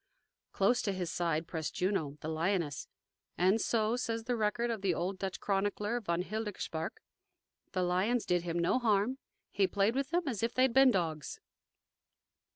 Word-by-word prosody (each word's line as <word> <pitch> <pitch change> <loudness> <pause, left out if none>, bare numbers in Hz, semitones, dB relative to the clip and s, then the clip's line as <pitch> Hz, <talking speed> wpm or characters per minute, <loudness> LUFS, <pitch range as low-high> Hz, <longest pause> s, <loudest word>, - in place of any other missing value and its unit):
Close 220 +5 +2
to 200 - -1
his 180 -3 -3
side 165 -2 0
pressed 160 -3 -4
Juno, 170 -7 -1
the - - -5
lioness, 160 -2 -1 0.5
and, 190 +5 +3
so 225 0 +1
says 230 -2 -2
the 245 +1 -1
record 235 +2 0
of 220 -4 -3
the 190 -4 +1
old 185 +3 -2
Dutch 190 -1 -3
chronicler, 205 +3 0
von 170 -3 -1
Hildegaersberch, 205 -6 -4 0.8
"the 185 - +1
lions 190 +7 +1
did 175 -1 +2
him 170 0 -3
no 170 +9 +2
harm; 225 +2 +1 0.3
he 195 -2 +2
played 200 +4 +2
with 275 +1 -1
them 345 0 0
as 235 -6 -2
if 230 +1 -1
they 255 - +4
had 260 -3 +3
been 265 +1 +7
dogs." 165 - -1
195 Hz, 170 wpm, -32 LUFS, 175-230 Hz, 0.8 s, been